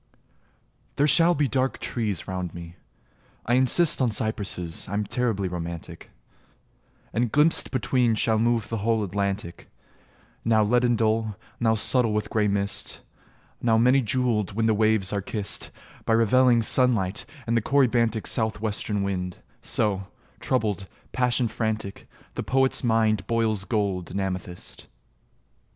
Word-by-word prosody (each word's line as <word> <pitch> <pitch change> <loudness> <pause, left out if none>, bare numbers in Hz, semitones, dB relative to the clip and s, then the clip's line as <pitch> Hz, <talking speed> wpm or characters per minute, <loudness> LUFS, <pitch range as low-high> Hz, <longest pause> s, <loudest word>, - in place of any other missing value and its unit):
There 145 - +3
shall 165 +4 +5
be 145 -1 +1
dark 130 +1 0
trees 105 -6 -3
round 90 -2 -4
me: 85 0 -9 0.7
I 120 - 0
insist 130 +6 +4
On 125 - +3
cypresses: 100 -6 -2
I'm 100 +2 -1
terribly 105 -3 -1
romantic 85 -2 -7 1.0
And 120 -1 0
glimpsed 150 +3 +4
between 125 -3 +1
shall 110 0 +1
move 115 -1 +1
the 115 - -2
whole 110 +1 +1
Atlantic, 100 -2 -4 0.7
Now 110 -1 +3
leaden 120 +2 +2
dull, 110 -1 0 0.2
now 110 -1 +2
subtle 115 0 +2
with 105 0 -2
grey 105 -2 +2
mist, 100 0 -1 0.6
Now 115 -2 +3
many 125 +4 +4
jewelled, 115 -4 0
when 110 +2 0
the 110 - +3
waves 110 -2 +2
are 100 - -1
kissed 100 +1 -4 0.3
By 115 - +1
revelling 120 +1 +4
sunlight 110 -6 +2 0.2
and 115 - 0
the 115 - +2
corybantic 115 -4 +2
South 110 -2 -1
Western 105 -1 -2
wind: 90 -2 -3 0.2
so, 100 -3 -1 0.3
troubled, 105 -6 -1 0.2
passion 125 -1 +1
frantic, 110 -2 -4 0.2
The - - -4
poet's 135 0 +1
mind 110 -4 +1
boils 110 -3 0
gold 100 -4 -1
and 100 - -3
amethyst. 90 -2 -5
110 Hz, 135 wpm, -25 LUFS, 100-120 Hz, 1.0 s, shall